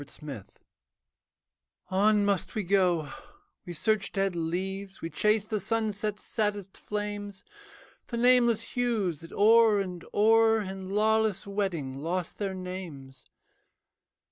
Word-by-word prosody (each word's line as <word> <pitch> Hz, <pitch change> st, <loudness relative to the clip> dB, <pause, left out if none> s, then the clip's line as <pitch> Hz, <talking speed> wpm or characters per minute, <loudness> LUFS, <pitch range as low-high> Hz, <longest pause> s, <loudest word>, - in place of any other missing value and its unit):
ART 145 Hz, -, -12 dB
COLOURS 140 Hz, -10 st, -7 dB, 1.5 s
On 205 Hz, +2 st, +3 dB
must 200 Hz, -2 st, -1 dB
we 215 Hz, -, -1 dB
go: 180 Hz, -5 st, +1 dB, 0.5 s
we 175 Hz, -, -5 dB
search 210 Hz, +4 st, 0 dB
dead 195 Hz, -2 st, 0 dB
leaves, 190 Hz, +4 st, -3 dB
We 165 Hz, -, -6 dB
chase 210 Hz, +5 st, +1 dB
the 215 Hz, -1 st, -1 dB
sunset's 215 Hz, -2 st, -2 dB
saddest 205 Hz, -3 st, -2 dB
flames, 205 Hz, -1 st, -5 dB, 0.6 s
The 235 Hz, -, -4 dB
nameless 240 Hz, -2 st, +3 dB
hues 220 Hz, -, -1 dB
that 165 Hz, -, -11 dB
o'er 220 Hz, 0 st, +5 dB
and 180 Hz, -3 st, -4 dB
o'er 225 Hz, +1 st, +4 dB
In 190 Hz, -1 st, -6 dB
lawless 215 Hz, 0 st, +1 dB
wedding 175 Hz, -10 st, -3 dB
lost 170 Hz, +3 st, -3 dB
their 195 Hz, -2 st, -2 dB
names. 170 Hz, -8 st, -8 dB
200 Hz, 120 wpm, -28 LUFS, 180-215 Hz, 1.5 s, o'er